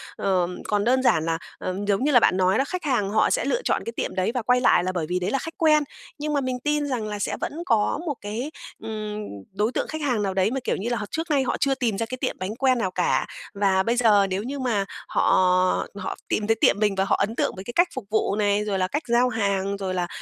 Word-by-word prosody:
Ờ, 185 Hz, -3 st, +1 dB, 0.2 s
còn 205 Hz, -1 st, +1 dB
đơn 255 Hz, +3 st, +2 dB
giản 160 Hz, -10 st, +3 dB
là, 165 Hz, 0 st, 0 dB, 0.2 s
ờ, 185 Hz, -, -4 dB
giống 205 Hz, +4 st, +1 dB
như 295 Hz, -, +2 dB
là 245 Hz, -, +7 dB
bạn 185 Hz, -, +3 dB
nói 185 Hz, +2 st, +3 dB
đó, 270 Hz, -, +3 dB
khách 365 Hz, -1 st, -4 dB
hàng 245 Hz, -9 st, +1 dB
họ 215 Hz, +2 st, +3 dB
sẽ -, -, +1 dB
lựa -, -, 0 dB
chọn -, -, 0 dB
cái 230 Hz, -, -3 dB
tiệm -, -, -3 dB
đấy 185 Hz, +3 st, +1 dB
và 250 Hz, -, -1 dB
quay 250 Hz, +2 st, +2 dB
lại 180 Hz, -8 st, +4 dB
là 185 Hz, -, -1 dB
bởi 175 Hz, -4 st, -2 dB
vì 180 Hz, +1 st, 0 dB
đấy 180 Hz, +3 st, -2 dB
là 275 Hz, -, +1 dB
khách 325 Hz, +5 st, -7 dB
quen. 305 Hz, -2 st, +4 dB, 0.3 s
Nhưng 300 Hz, 0 st, -3 dB
mà 285 Hz, -, +1 dB
mình 255 Hz, -1 st, -2 dB
tin 295 Hz, +2 st, 0 dB
rằng 245 Hz, -6 st, -2 dB
là 210 Hz, -1 st, -4 dB
sẽ -, -, -2 dB
vẫn 325 Hz, +4 st, -4 dB
có 225 Hz, +2 st, +2 dB
một 295 Hz, -4 st, -2 dB
cái, 225 Hz, +8 st, -4 dB, 0.3 s
ừm, 215 Hz, -1 st, -4 dB, 0.3 s
đối 210 Hz, +4 st, 0 dB
tượng -, -, -2 dB
khách 315 Hz, 0 st, -5 dB
hàng 250 Hz, -8 st, 0 dB
nào 195 Hz, -1 st, -1 dB
đấy 190 Hz, +3 st, +2 dB
mà, 270 Hz, -, -1 dB
kiểu -, -, 0 dB
như 215 Hz, +5 st, -3 dB
là, 240 Hz, -, 0 dB
họ 210 Hz, -, -4 dB
trước 325 Hz, +2 st, -3 dB
nay 280 Hz, -2 st, +3 dB
họ 260 Hz, -, -1 dB
chưa 275 Hz, -1 st, +2 dB
tìm 235 Hz, -6 st, -1 dB
ra 230 Hz, -, -1 dB
cái 255 Hz, +3 st, -6 dB
tiệm -, -, -2 dB
bánh 190 Hz, +4 st, -4 dB
quen 260 Hz, 0 st, +2 dB
nào 190 Hz, -6 st, -1 dB
cả. 180 Hz, -1 st, +1 dB, 0.3 s
Và 195 Hz, -1 st, +2 dB
bây 235 Hz, +4 st, +1 dB
giờ 210 Hz, -5 st, +5 dB
nếu 190 Hz, +2 st, -2 dB
như 275 Hz, +4 st, -5 dB
mà 230 Hz, -6 st, 0 dB, 0.2 s
họ -, -, 0 dB, 0.7 s
họ 205 Hz, -, -4 dB
tìm 210 Hz, -, -1 dB
thấy 225 Hz, -, +3 dB
tiệm 205 Hz, -, +4 dB
mình 210 Hz, -2 st, +2 dB
và 190 Hz, 0 st, +1 dB
họ 195 Hz, -, +2 dB
ấn 210 Hz, +3 st, -1 dB
tượng -, -, 0 dB
với 190 Hz, -, -7 dB
cái 240 Hz, -, -7 dB
cách 350 Hz, +1 st, +5 dB
phục 260 Hz, -5 st, -5 dB
vụ 215 Hz, -2 st, +1 dB
này, 205 Hz, 0 st, +1 dB
rồi 200 Hz, -2 st, -1 dB
là 185 Hz, -, +1 dB
cách 295 Hz, +9 st, -2 dB
giao 240 Hz, +1 st, +3 dB
hàng, 200 Hz, -3 st, -1 dB
rồi 190 Hz, -2 st, -3 dB
là 180 Hz, -1 st, -1 dB
220 Hz, 280 wpm, -24 LUFS, 195-260 Hz, 0.7 s, là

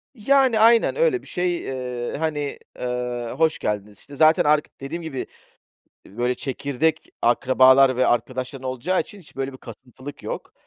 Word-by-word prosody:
Yani, 260 Hz, 0 st, +3 dB
aynen. 230 Hz, +1 st, +5 dB
Öyle 475 Hz, -6 st, +2 dB
bir -, -, -17 dB
şey, 175 Hz, -1 st, -1 dB
eee, 125 Hz, -2 st, -5 dB
hani, 150 Hz, -2 st, -3 dB, 0.2 s
eee, 125 Hz, -1 st, -3 dB
hoş 160 Hz, -1 st, +2 dB
geldiniz 105 Hz, -1 st, -4 dB
İşte, 145 Hz, -, -15 dB
artık 155 Hz, +1 st, +6 dB
zaten 150 Hz, 0 st, +4 dB, 0.2 s
dediğim 165 Hz, +5 st, -6 dB
gibi, 140 Hz, -5 st, -5 dB, 0.8 s
böyle, 120 Hz, +5 st, -2 dB
çekirdek 140 Hz, +4 st, -2 dB
akrabalar 130 Hz, +2 st, +5 dB
ve 130 Hz, -, +2 dB
arkadaşların 130 Hz, +2 st, -2 dB
olacağı 135 Hz, +9 st, -1 dB
için 205 Hz, -, -7 dB
hiç 175 Hz, -, -17 dB
böyle 135 Hz, 0 st, -3 dB
bir 130 Hz, -, -12 dB
kasıntılık 125 Hz, +5 st, -11 dB
yok. -, -, -6 dB
135 Hz, 150 wpm, -23 LUFS, 125-160 Hz, 0.8 s, artık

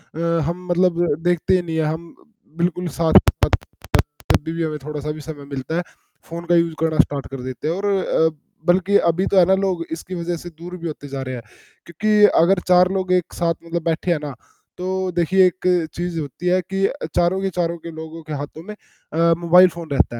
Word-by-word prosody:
अ, -, -, -6 dB, 0.3 s
हम 180 Hz, +2 st, -4 dB
मतलब 175 Hz, -1 st, +2 dB, 0.2 s
देखते 175 Hz, +1 st, +2 dB
ही 185 Hz, -, +2 dB
नहीं 165 Hz, -2 st, -4 dB
हैं, 160 Hz, -, +2 dB
हम 160 Hz, +2 st, -4 dB, 0.4 s
बिल्कुल 175 Hz, +1 st, 0 dB
साथ-साथ 165 Hz, -1 st, +4 dB, 0.9 s
जब -, -, -1 dB
भी 160 Hz, -, -4 dB
भी 165 Hz, 0 st, -2 dB
हमें 155 Hz, -1 st, -2 dB
थोड़ा 150 Hz, 0 st, -5 dB
सा 150 Hz, +1 st, -3 dB
भी 155 Hz, 0 st, -7 dB
समय 145 Hz, -2 st, -8 dB
मिलता 140 Hz, +2 st, -5 dB
है, 175 Hz, -, +1 dB, 0.5 s
फ़ोन 170 Hz, +1 st, -6 dB
का 175 Hz, -, +3 dB
यूज़ 170 Hz, -1 st, +2 dB
करना 160 Hz, -1 st, 0 dB
स्टार्ट 140 Hz, -1 st, +2 dB
कर 135 Hz, -1 st, -7 dB
देते 130 Hz, +3 st, -5 dB
हैं 165 Hz, -, 0 dB
और 200 Hz, +2 st, -3 dB
अ, 190 Hz, -5 st, +2 dB, 0.4 s
बल्कि 185 Hz, +3 st, +4 dB
अभी 175 Hz, +3 st, +1 dB
तो 195 Hz, -, +3 dB
है 180 Hz, -, +7 dB
ना, 190 Hz, -, +3 dB
लोग 190 Hz, -3 st, -1 dB
इसकी 170 Hz, +3 st, -5 dB
वजह 170 Hz, 0 st, -2 dB
से 175 Hz, -, -9 dB
दूर 175 Hz, +2 st, -9 dB
भी 170 Hz, -1 st, -5 dB
होते 145 Hz, -2 st, -7 dB
जा 135 Hz, -1 st, -5 dB
रहे 130 Hz, -1 st, -4 dB
हैं। 120 Hz, -, -6 dB, 0.4 s
क्योंकि 210 Hz, +5 st, +3 dB
अगर 180 Hz, +3 st, +4 dB
4 180 Hz, 0 st, +6 dB
लोग 190 Hz, -1 st, -1 dB
एक 180 Hz, -2 st, 0 dB
साथ 170 Hz, -1 st, +1 dB
मतलब 170 Hz, 0 st, -3 dB
बैठे 165 Hz, +2 st, 0 dB
हैं 165 Hz, -, +1 dB
ना, 145 Hz, -, -4 dB, 0.4 s
तो 185 Hz, 0 st, -2 dB
देखिए 185 Hz, +2 st, +4 dB
एक 180 Hz, 0 st, -3 dB, 0.3 s
चीज़ 175 Hz, -1 st, -3 dB
होती 155 Hz, +4 st, -5 dB
है 185 Hz, +1 st, +3 dB
कि 195 Hz, +2 st, 0 dB, 0.3 s
चारों 175 Hz, +2 st, +2 dB
के 195 Hz, -, 0 dB
चारों 170 Hz, -1 st, -1 dB
के 170 Hz, -, -5 dB
लोगों 160 Hz, +1 st, -8 dB
के 155 Hz, -, -7 dB
हाथों 145 Hz, +2 st, -6 dB
में 210 Hz, +3 st, -8 dB
अ, 165 Hz, -4 st, -1 dB
मोबाइल 175 Hz, +2 st, +7 dB
फ़ोन 170 Hz, -2 st, -9 dB
रहता 120 Hz, -4 st, +1 dB
170 Hz, 220 wpm, -21 LUFS, 160-180 Hz, 0.9 s, है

